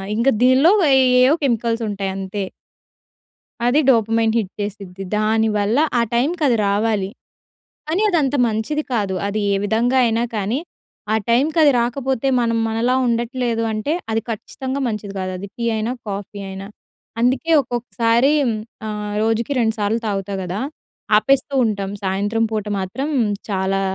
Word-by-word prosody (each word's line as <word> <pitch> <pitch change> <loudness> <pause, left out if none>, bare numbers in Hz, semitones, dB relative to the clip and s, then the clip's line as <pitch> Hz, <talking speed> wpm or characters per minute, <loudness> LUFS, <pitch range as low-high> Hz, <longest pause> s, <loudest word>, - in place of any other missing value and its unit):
ఇంక 230 +4 0 0.2
దీనిలో 260 +7 +6 0.2
ఎయ్యేయో 255 +1 +5
కెమికల్స్ 235 -2 0
ఉంటాయి 195 -1 -3
అంతే. 195 +1 -4 1.2
అది 250 +5 +4
డోపమైన్ 225 -2 +3
హిట్ 200 -4 -1
చేసిద్ది. 195 -2 -6
దానివల్ల 215 0 +1 0.2
ఆ - - +4
టైంకది 280 0 +2
రావాలి. 205 -1 0 0.8
కానీ 340 +6 0
అదంత 290 -7 +1
మంచిది 225 +8 -2
కాదు 200 -4 0
అది 205 +1 -2
ఏ - - +2
విధంగా 230 +5 +1
అయినా 230 +1 +1
కానీ 215 +6 -1 0.5
ఆ - - +4
టైంకది 295 +5 +4
రాకపోతే 260 +2 -1
మనం 230 -1 +1
మనలా 230 +3 0
ఉండట్లేదు 235 0 -1
అంటే 215 +9 -1 0.2
అది 225 0 +1
ఖచ్చితంగా 260 +5 -4
మంచిది 210 -3 -4
గాదు. 185 0 -3
అది 200 +2 -7
టీ 235 - -2
అయినా 220 +2 -1 0.2
కాఫీ 200 0 -5
అయినా. 190 +1 -7 0.5
అందుకే 260 +7 +1
ఒక్కొక్కసారి 240 +1 +1 0.6
ఆహ్, 210 -1 -4
రోజుకి 225 +4 0
రెండు 225 -2 +1
సార్లు 210 +3 0
తాగుతా 200 -1 -2
గదా 180 +3 -4 0.6
ఆపేస్తూ 275 +5 +1
ఉంటాం 200 -2 -2
సాయంత్రం 205 +4 0
పూట 215 -1 -2
మాత్రం 265 +10 -3 0.4
చాలా 195 0 0
225 Hz, 135 wpm, -20 LUFS, 205-250 Hz, 1.2 s, దీనిలో